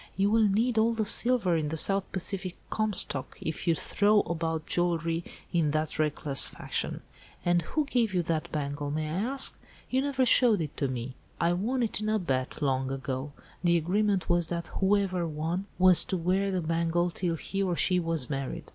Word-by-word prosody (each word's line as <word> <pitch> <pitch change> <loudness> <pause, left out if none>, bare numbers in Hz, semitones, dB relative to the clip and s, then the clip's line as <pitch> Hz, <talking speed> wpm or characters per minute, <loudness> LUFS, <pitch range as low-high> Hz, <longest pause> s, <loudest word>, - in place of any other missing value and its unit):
"You 200 +1 +1
will 220 -1 +4
need 220 +3 +1
all 230 +1 +3
the 220 -1 -1
silver 230 -4 +3
in 155 -2 -1
the 160 +2 -3
South 195 +4 -1
Pacific 185 -1 -2 0.2
Comstock, 205 -10 0
if 160 - -5
you 165 - +4
throw 205 +5 +2
about 165 -1 -3
jewellery 170 -1 0 0.3
in 165 -3 +2
that 155 +1 -2
reckless 150 -2 +1
fashion. - - -3 0.4
And 175 0 +3
who 300 - -2
gave 240 -6 0
you 180 -2 0
that 160 -1 -2
bangle, 145 -1 -3
may 155 +1 -2
I 155 - -4
ask? 250 +9 +2 0.4
You 260 +1 +2
never 270 -2 0
showed 235 -4 +5
it 155 -3 -4
to 140 - 0
me." 125 0 -5 0.3
"I 170 +1 +2
won 240 +8 -1
it 225 - -1
in 215 - -1
a 215 - +2
bet, 135 -5 -2
long 135 -1 0
ago. 135 +1 -4 0.3
The 170 -1 +4
agreement 195 +3 0
was 175 -1 +2
that 170 -1 -5
whoever 190 -3 +1
won 165 +5 -3
was 185 -1 +8
to 190 - -2
wear 185 +3 0
the 185 -2 -1
bangle 165 +2 0
till 170 0 -2
he 195 +4 -4
or 185 -3 0
she 180 +1 +1
was 165 -6 -1
married. 135 -1 -4
175 Hz, 190 wpm, -28 LUFS, 155-200 Hz, 0.4 s, was